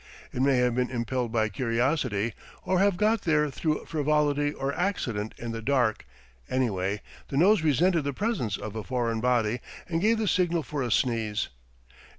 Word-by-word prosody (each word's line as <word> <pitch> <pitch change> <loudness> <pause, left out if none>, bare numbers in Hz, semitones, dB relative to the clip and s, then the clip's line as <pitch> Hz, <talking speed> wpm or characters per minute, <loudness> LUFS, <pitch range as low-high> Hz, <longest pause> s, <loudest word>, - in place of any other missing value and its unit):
It 125 - -2
may 135 -1 +4
have 125 -1 +2
been 125 +1 0
impelled 120 -1 -2
by 110 -2 +1
curiosity, 115 -1 0 0.3
or 185 -1 +1
have 200 -2 +3
got 215 +2 +2
there 150 -3 +2
through 155 +2 -1
frivolity 145 -1 +1
or 140 -1 -3
accident 120 - -2
in 120 -1 -5
the 115 0 -5
dark; 120 -3 +1 0.4
anyway, 100 -6 0 0.3
the 135 - -3
nose 190 +4 +5
resented 160 +2 +3
the 140 - 0
presence 180 - -1
of 110 0 -7
a 110 - -4
foreign 115 -3 -1
body 120 -2 +1 0.3
and 165 -1 -1
gave 225 +3 +3
the 220 -1 -1
signal 175 -3 +2
for 145 +2 -4
a 125 - -1
sneeze. 110 -3 0
130 Hz, 170 wpm, -27 LUFS, 115-160 Hz, 0.4 s, nose